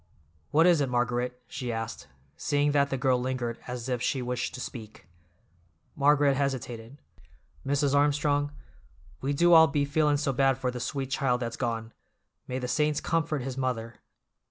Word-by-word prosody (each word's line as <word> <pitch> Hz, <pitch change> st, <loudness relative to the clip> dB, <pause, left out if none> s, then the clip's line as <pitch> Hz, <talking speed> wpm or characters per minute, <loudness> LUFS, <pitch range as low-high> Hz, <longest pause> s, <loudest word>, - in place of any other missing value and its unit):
"What 160 Hz, +3 st, +4 dB
is 175 Hz, -4 st, +5 dB
it, 135 Hz, -, 0 dB
Margaret?" 125 Hz, 0 st, -1 dB
she 125 Hz, -3 st, -4 dB
asked, 115 Hz, 0 st, -5 dB, 0.3 s
seeing 145 Hz, -, +1 dB
that 140 Hz, -1 st, +2 dB
the 135 Hz, -, -1 dB
girl 125 Hz, -1 st, +2 dB
lingered 125 Hz, -2 st, -3 dB
as 125 Hz, -1 st, -5 dB
if 125 Hz, -2 st, -1 dB
she 135 Hz, -, 0 dB
wished 125 Hz, 0 st, -3 dB
to -, -, -7 dB
speak. 110 Hz, -3 st, -8 dB, 0.9 s
Margaret 145 Hz, -1 st, +4 dB
hesitated. 130 Hz, -2 st, -3 dB, 0.7 s
"Mrs. 145 Hz, 0 st, +1 dB
Armstrong, 145 Hz, 0 st, +2 dB, 0.7 s
we 135 Hz, -, -1 dB
do 170 Hz, +5 st, +4 dB
all 160 Hz, -1 st, +9 dB
be 145 Hz, -2 st, 0 dB
feelin' 150 Hz, 0 st, +2 dB
so 140 Hz, -2 st, -1 dB
bad 135 Hz, 0 st, +3 dB
for 130 Hz, -1 st, -1 dB
the 125 Hz, -, -6 dB
sweet 135 Hz, +2 st, -3 dB
child 130 Hz, -3 st, +1 dB
that's 120 Hz, -1 st, -4 dB
gone. 115 Hz, -2 st, -3 dB, 0.5 s
May 130 Hz, -, -3 dB
the 125 Hz, -1 st, -3 dB
saints 150 Hz, +3 st, +1 dB
comfort 160 Hz, -4 st, -1 dB
his 135 Hz, 0 st, -5 dB
mother! 115 Hz, -3 st, -3 dB
135 Hz, 165 wpm, -28 LUFS, 125-145 Hz, 0.9 s, all